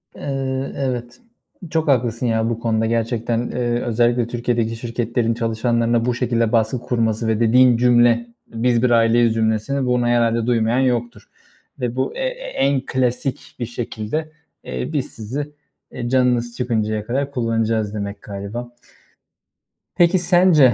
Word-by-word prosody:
Iıı, 135 Hz, -1 st, -3 dB
evet, 125 Hz, -, -3 dB, 0.5 s
çok 160 Hz, 0 st, 0 dB
haklısın 120 Hz, -3 st, +1 dB
ya 115 Hz, -1 st, +1 dB
bu 115 Hz, -1 st, -2 dB
konuda 115 Hz, -1 st, 0 dB
gerçekten, 115 Hz, 0 st, -1 dB
ııı, 120 Hz, 0 st, -1 dB
özellikle 120 Hz, 0 st, +2 dB
Türkiye’deki 120 Hz, -1 st, -1 dB
şirketlerin 115 Hz, 0 st, -1 dB
çalışanlarına 115 Hz, 0 st, 0 dB
bu 125 Hz, -, +1 dB
şekilde 115 Hz, -2 st, 0 dB
baskı 115 Hz, +2 st, +1 dB
kurması 115 Hz, -2 st, -1 dB
ve 110 Hz, -1 st, +1 dB
dediğin 120 Hz, +1 st, +5 dB
cümle, 120 Hz, -1 st, +4 dB, 0.2 s
"Biz 120 Hz, +1 st, 0 dB
bir 125 Hz, -, +4 dB
aileyiz." 115 Hz, 0 st, +4 dB
cümlesini, 110 Hz, +5 st, 0 dB
bunu 125 Hz, -1 st, +1 dB
herhâlde 115 Hz, -1 st, +2 dB
duymayan 115 Hz, 0 st, +2 dB
yoktur 120 Hz, -2 st, -1 dB, 0.5 s
ve 125 Hz, -2 st, -2 dB
bu, 130 Hz, -, -2 dB
e -, -, -6 dB
e -, -, -6 dB
en 140 Hz, -, +1 dB
klasik 125 Hz, +1 st, -2 dB
bir 120 Hz, -, -1 dB
şekilde, 120 Hz, +6 st, -4 dB, 0.3 s
eee, 65 Hz, 0 st, -5 dB
"Biz -, -, 0 dB
sizi, 135 Hz, +7 st, -5 dB, 0.4 s
eee, 120 Hz, -, -4 dB
canınız 125 Hz, -2 st, +1 dB
çıkıncaya 110 Hz, -4 st, -1 dB
kadar 135 Hz, +4 st, -2 dB
kullanacağız." 115 Hz, -4 st, 0 dB
demek 100 Hz, -1 st, -5 dB
galiba. 100 Hz, +4 st, -6 dB, 1.3 s
Peki 175 Hz, +2 st, +4 dB
sence, 175 Hz, -7 st, +5 dB
120 Hz, 140 wpm, -20 LUFS, 115-125 Hz, 1.3 s, dediğin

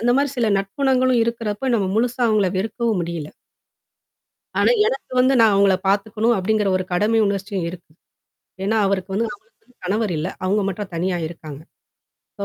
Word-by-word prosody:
அந்த 240 Hz, -, +2 dB
மாரி 285 Hz, +1 st, +2 dB
சில 235 Hz, -, +2 dB
நட்புணங்களும் 255 Hz, +5 st, +1 dB
இருக்கறப்ப 230 Hz, +1 st, -3 dB
நம்ம 195 Hz, -4 st, 0 dB
முழுசா 245 Hz, +2 st, 0 dB
அவங்கள 215 Hz, -3 st, +3 dB
வெறுக்கவும் 225 Hz, +2 st, -1 dB
முடியில. 165 Hz, -3 st, -5 dB, 1.3 s
ஆனா, -, -, +4 dB, 0.2 s
எனக்கு 270 Hz, -, -4 dB
வந்து 255 Hz, +2 st, +4 dB
நான் 220 Hz, -2 st, +5 dB
அவங்கள 195 Hz, -1 st, +4 dB
பாத்துக்கணும் 215 Hz, +4 st, +1 dB
அப்டிங்கற 210 Hz, +2 st, +1 dB
ஒரு 185 Hz, -, -3 dB
கடமை 215 Hz, +5 st, +2 dB
உணர்சியம் 195 Hz, -2 st, -2 dB
இருக்கு. 175 Hz, -2 st, -12 dB, 0.7 s
ஏன்னா, 215 Hz, +3 st, +1 dB
அவருக்கு 195 Hz, -1 st, -2 dB
வந்து 225 Hz, +3 st, +1 dB
அவங்களுக்குன்னு 250 Hz, -, -16 dB
கணவர் 205 Hz, +2 st, 0 dB
இல்ல. 155 Hz, +4 st, -2 dB, 0.2 s
அவுங்க 200 Hz, +3 st, +1 dB
மட்டும் 195 Hz, 0 st, -5 dB
தனியா 180 Hz, +2 st, -1 dB
இருக்காங்க. 155 Hz, -4 st, -10 dB, 0.8 s
சோ 200 Hz, -, -3 dB
205 Hz, 155 wpm, -21 LUFS, 190-230 Hz, 1.3 s, நான்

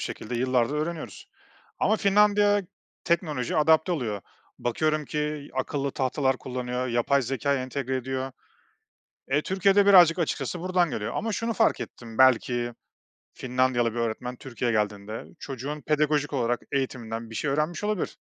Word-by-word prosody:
şekilde 120 Hz, -, -5 dB
yıllardır 125 Hz, +1 st, +1 dB
öğreniyoruz 155 Hz, -, -4 dB, 0.5 s
ama 215 Hz, +3 st, +3 dB
Finlandiya 205 Hz, 0 st, +4 dB, 0.4 s
teknolojiye 155 Hz, -7 st, 0 dB
adapte 160 Hz, +3 st, +4 dB
oluyor. 110 Hz, -, -2 dB, 0.4 s
Bakıyorum 155 Hz, +5 st, 0 dB
ki 150 Hz, -1 st, -3 dB
akıllı 135 Hz, +1 st, -1 dB
tahtalar 130 Hz, 0 st, 0 dB
kullanıyor, 125 Hz, 0 st, -3 dB
yapay 120 Hz, +4 st, +2 dB
zekâ 135 Hz, +3 st, 0 dB
entegre 130 Hz, 0 st, -2 dB
ediyor. 130 Hz, +1 st, -3 dB, 1.0 s
Eee, 145 Hz, +3 st, +2 dB
Türkiye'de 195 Hz, +1 st, +3 dB
birazcık 180 Hz, -4 st, +7 dB
açıkçası 160 Hz, 0 st, -2 dB
buradan 180 Hz, -2 st, +1 dB
geliyor 110 Hz, +1 st, -3 dB
ama 225 Hz, 0 st, -1 dB
şunu 230 Hz, +3 st, -1 dB
fark 225 Hz, -, +2 dB
ettim 115 Hz, -2 st, -8 dB
belki 120 Hz, -2 st, +3 dB, 0.6 s
Finlandiyalı 125 Hz, -2 st, +1 dB
bir 120 Hz, -, -3 dB
öğretmen 115 Hz, +2 st, -2 dB
Türkiye 120 Hz, -3 st, -3 dB
geldiğinde 105 Hz, 0 st, -2 dB
çocuğun 140 Hz, +3 st, -5 dB
pedagojik 150 Hz, -1 st, +1 dB
olarak 120 Hz, -2 st, 0 dB
eğitiminden 115 Hz, -4 st, -3 dB
bir 115 Hz, -, -9 dB
şey 140 Hz, +5 st, -1 dB
öğrenmiş 155 Hz, +7 st, -1 dB
olabilir. 210 Hz, -4 st, -2 dB
135 Hz, 135 wpm, -26 LUFS, 120-160 Hz, 1.0 s, birazcık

